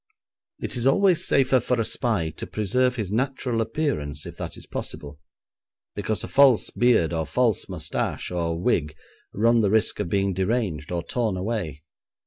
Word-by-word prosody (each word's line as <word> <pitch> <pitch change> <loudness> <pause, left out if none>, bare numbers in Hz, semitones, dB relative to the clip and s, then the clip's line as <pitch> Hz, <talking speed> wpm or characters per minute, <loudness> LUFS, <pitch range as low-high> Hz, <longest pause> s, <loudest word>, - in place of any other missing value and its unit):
It - - -3
is 120 +2 +1
always 185 +4 +3
safer 130 -1 +4
for 125 +1 -1
a 115 - +1
spy 105 -12 0
to - - -8
preserve 125 +5 +1
his 105 -6 -3
natural 125 0 -1
appearance 110 - -2
if - - -8
that - - -5
is - - -11
possible, 70 0 -6 0.7
because 105 +1 -2
a - - -4
false 135 -4 +4
beard 115 -9 +3
or 80 -1 -1
false 120 -5 +1
moustache - - -3
or 85 -2 -1
wig 80 -7 0 0.4
run 115 +3 +3
the 105 -3 +2
risk 110 +1 +2
of - - -2
being 100 0 +1
deranged 95 -5 -1
or 85 -1 -2
torn 110 -1 -1
away. 90 - -3
110 Hz, 165 wpm, -24 LUFS, 85-125 Hz, 0.7 s, safer